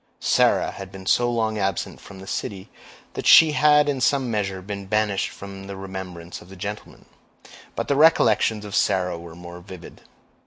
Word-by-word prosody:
Sarah - - +2
had 95 -1 -9
been 95 -1 -11
so 120 +5 +2
long 110 -2 -1
absent 95 -2 -3
from 100 - -12
the 95 - -11
city, 95 0 -5 0.4
that - - -4
she 160 -1 +8
had 150 +1 +4
in 140 -3 -1
some 130 -1 +1
measure 100 -3 -2
been 100 0 -7
banished 105 -1 0
from 95 0 -10
the 100 -1 -7
remembrance 95 -3 -8
of 90 - -16
the 95 - -11
gentleman; 100 +3 -8 0.7
but - - -3
the 140 - +1
recollections 115 -8 +3
of 100 - -9
Sarah 90 -2 +1
were 85 -1 -11
more 85 0 -10
vivid. 90 -1 -12
100 Hz, 180 wpm, -23 LUFS, 95-110 Hz, 0.7 s, she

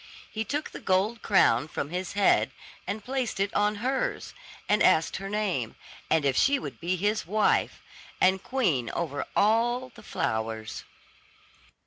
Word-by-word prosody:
He 220 - -2
took 290 +6 -3
the - - -8
gold 200 +5 +1
crown 150 - +3
from 150 -1 -4
his 180 +1 -3
head, 200 0 +3 0.4
and 215 0 -3
placed 255 -5 -2
it 200 +1 0
on 210 +1 +2
hers, 275 - -1 0.3
and 210 0 +2
asked 160 - +4
her 195 +1 -6
name, 195 - -1 0.3
and 160 -3 +2
if 135 -2 +2
she 280 - +4
would - - -7
be 175 +2 -1
his 205 +1 -1
wife, 215 +3 +1 0.4
and 190 0 +3
queen 180 - 0
over 145 -4 -3
all 240 +4 +2
the - - -14
flowers. 110 0 -3
200 Hz, 150 wpm, -27 LUFS, 160-225 Hz, 0.4 s, asked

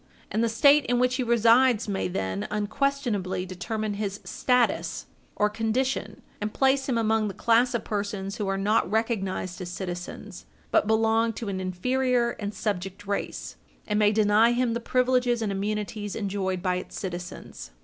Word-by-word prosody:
And 220 - +1
the 230 - +2
State 280 +5 +5
in 245 +1 +2
which 250 +1 +2
he - - 0
resides 235 0 +4
may 200 -2 -1
then, 100 - -3
unquestionably, 210 -4 -1
determine 210 +4 -3
his 200 -1 -3
status 250 -1 0 0.3
or 210 - +3
condition, 225 +5 -2 0.2
and 210 +1 -2
place 270 +2 +2
him 245 - +1
among 220 -1 +2
the 195 - -5
class 240 +2 +3
of 235 - -1
persons 200 -1 -3
who 205 - -2
are 195 0 0
not 205 +1 +2
recognised 195 -4 -1
as 180 - -5
citizens, 175 -1 -7 0.2
but - - +3
belong 225 +1 +2
to 220 -1 -5
an 190 -1 -3
inferior 245 +6 +1
and 205 -1 -4
subject 195 -1 -3
race, 200 0 -4 0.3
and 210 0 0
may 210 -1 +5
deny 215 +2 +4
him 245 -1 +1
the 235 - -1
privileges 250 -1 +1
and 210 - -1
immunities 205 +1 -3
enjoyed 190 -3 -2
by 180 -1 +1
its - - -7
citizens. 180 -1 -7
215 Hz, 165 wpm, -26 LUFS, 195-235 Hz, 0.3 s, State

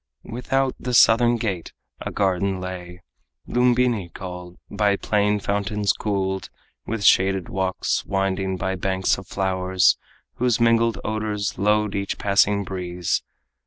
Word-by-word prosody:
Without 130 +2 -1
the 125 0 -2
southern 120 +1 +6
gate 100 -7 -3 0.3
a - - -3
garden 95 -1 0
lay, 90 -1 -7 0.4
Lumbini 125 -6 +2
called, 90 -1 -8
by 105 -1 +1
playing 105 0 +1
fountains 100 0 0
cooled, 95 -2 -2 0.4
With 115 -2 -3
shaded 95 -1 +3
walks 95 -1 -1
winding 95 -1 -1
by 95 +1 -2
banks 95 +1 0
of 95 - -12
flowers, 95 -1 +1 0.4
Whose 120 -2 +1
mingled 115 -2 +3
odors 105 -2 -2
load 105 0 +2
each 100 0 -2
passing 100 0 +2
breeze. 90 -2 -2
100 Hz, 125 wpm, -23 LUFS, 95-110 Hz, 0.4 s, southern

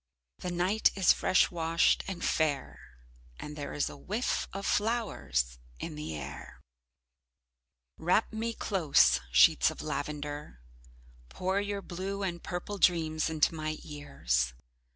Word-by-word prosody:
The 180 - -4
night 180 +5 +2
is 190 -2 +5
fresh - - +3
washed 165 -1 +2
and 185 -2 -4
fair 145 -4 0 0.6
and 150 - -7
there 145 -1 -5
is 145 - 0
a - - -7
whiff 215 +6 -2
of 195 +1 -5
flowers 200 - 0 0.2
in - - -5
the 75 +1 -5
air. - - -8 1.4
Wrap 185 +7 +2
me 225 +1 -2
close, 175 -8 +3
sheets 60 -1 +6
of - - -7
lavender. 145 - -4 0.7
Pour 190 - -1
your 200 -1 -3
blue 195 +3 -4
and 175 -3 -3
purple 185 +3 -5
dreams 160 -3 +2
into 160 0 +2
my 155 -1 -3
ears. 60 - -1
165 Hz, 130 wpm, -30 LUFS, 145-195 Hz, 1.4 s, sheets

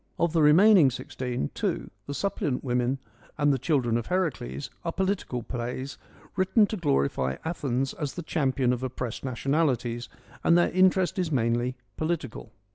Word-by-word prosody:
Of 170 -1 +1
the 165 - +3
remaining 170 +1 +7
sixteen, 125 - -4
two, - - -2 0.2
the 140 - -4
Sup 200 +5 -2
pliant 130 -4 -1
Women 125 0 0 0.4
and 145 -1 +3
the 135 - -1
Children 125 -5 +1
of 120 - -4
Heracles, 150 - -2
are 165 - -1
political 190 - -2
plays, 125 +3 -5 0.4
written 195 +3 +4
to 215 - -4
glorify 70 - +1
Athens 135 -5 -1
as 145 -3 -4
the 175 - -5
champion 135 -5 +1
of 125 - -3
oppressed 125 -2 -4
nationalities, 130 -2 0 0.3
and 170 - +5
their 175 - +3
interest 185 +1 +3
is 175 -3 -1
manly 120 -1 +1 0.2
political. 155 -9 -3
135 Hz, 155 wpm, -27 LUFS, 125-170 Hz, 0.4 s, remaining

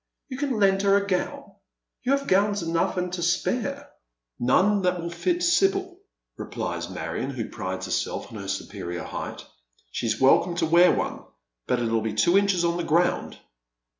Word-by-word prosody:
You 255 -1 -6
can 275 -5 -1
lend 195 -1 +3
her 200 0 +4
a 200 - -1
gown. 185 -2 -2 0.6
You 255 +2 +1
have 275 0 0
gowns 200 -1 +2
enough 165 +2 0
and 180 0 -2
to 180 - -3
spare." 190 +6 -1 0.5
"None 195 +11 +3
that 180 -1 +1
will 170 0 -4
fit 350 - -1
Sibyl," 375 +1 +2 0.4
replies - - -4
Marion, - - -4
who - - -4
prides - - -4
herself - - -3
on 110 - -7
her 100 - -7
superior 95 -3 -4
height. - - -6 0.2
" - - -39
She's 110 -2 -2
welcome 170 +6 +4
to - - +1
wear 170 +3 +6
one, - - -2 0.4
but 125 - +2
it 120 - -1
"U 115 -1 +2
be 110 -1 -3
two 145 - +3
inches 195 -3 +3
on 170 0 +1
the 175 - -2
ground." 170 +3 +1
180 Hz, 180 wpm, -25 LUFS, 160-205 Hz, 0.6 s, wear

